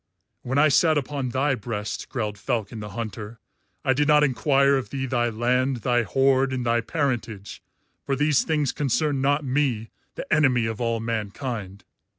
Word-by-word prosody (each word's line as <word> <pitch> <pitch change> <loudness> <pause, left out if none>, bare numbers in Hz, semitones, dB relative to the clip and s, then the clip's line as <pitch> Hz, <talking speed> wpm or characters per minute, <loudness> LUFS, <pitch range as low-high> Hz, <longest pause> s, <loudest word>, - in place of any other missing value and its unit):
"When 130 +3 -2
I 155 +1 +5
sat 155 +2 +4
upon 140 -2 -2
thy 135 +3 +1
breast," 105 -3 -5
growled 105 -6 -3
Falcon 115 0 -3
the 105 0 -7
Hunter, 115 0 -6 0.5
"I 130 - +4
did 145 +3 +1
not 150 -1 +5
enquire 140 0 +3
of 135 -2 -2
thee 135 -1 -3
thy 120 -2 0
land, 125 +2 0
thy 120 -1 +3
horde, 135 +2 +2
and 125 -2 -2
thy 115 0 +2
parentage, 115 -7 -3 0.4
for 135 - -1
these 145 0 +2
things 150 -4 0
concern 145 0 0
not 145 +2 +1
me, 125 -5 0 0.2
the - - -5
enemy 130 -6 +3
of 110 +1 -4
all 115 -1 0
mankind. 110 -2 -4
130 Hz, 165 wpm, -24 LUFS, 115-140 Hz, 0.5 s, I